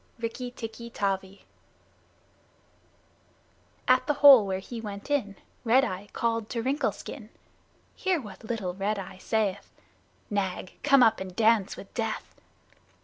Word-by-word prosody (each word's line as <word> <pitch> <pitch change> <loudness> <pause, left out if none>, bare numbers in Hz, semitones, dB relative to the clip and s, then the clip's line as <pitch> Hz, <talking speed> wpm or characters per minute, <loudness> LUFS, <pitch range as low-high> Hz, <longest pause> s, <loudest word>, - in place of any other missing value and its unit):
"Rikki 235 +2 -4
Tikki 235 -1 -8
Tavi" 195 -2 -3 2.4
At 255 0 +4
the 295 - +2
hole 275 -7 +8
where 190 -1 -1
he 225 +5 -7
went 205 +4 -7
in 210 -9 0 0.3
Red 255 +4 +4
Eye 190 -1 -5
called 230 -2 -1
to 230 -2 -3
Wrinkle 270 +4 +1
Skin. - - -9 0.7
Hear 375 -3 0
what 210 -7 -11
little 215 -5 -3
Red 200 +3 -1
Eye 190 -1 -8
saith: 205 -2 -1 0.6
"Nag, 190 -3 -2
come 275 -3 +6
up 225 -1 +4
and 185 -1 -7
dance 220 -2 +3
with 195 - -11
death!" 225 -2 -3
220 Hz, 135 wpm, -28 LUFS, 195-245 Hz, 2.4 s, hole